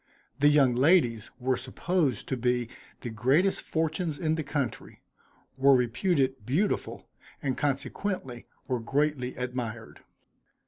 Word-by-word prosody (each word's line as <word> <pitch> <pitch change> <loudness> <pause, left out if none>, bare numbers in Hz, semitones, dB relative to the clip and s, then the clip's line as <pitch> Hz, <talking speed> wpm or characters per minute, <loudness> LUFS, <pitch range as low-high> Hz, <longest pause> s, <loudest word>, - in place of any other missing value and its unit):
The 145 - +5
young 145 -4 +5
ladies 125 - +3
were 130 +1 +1
supposed 135 - -1
to 130 - 0
be 125 -1 0 0.3
the 120 - -5
greatest 135 - +2
fortunes 160 0 -1
in 155 0 0
the 160 - -1
country, 145 -4 -4 0.6
were 135 0 +6
reputed 130 - +1
beautiful, 160 - -1 0.3
and 135 -5 -1
consequently 140 - -3 0.2
were 125 -2 0
greatly 135 +1 -1
admired. 125 -3 -5
130 Hz, 120 wpm, -28 LUFS, 125-155 Hz, 0.6 s, were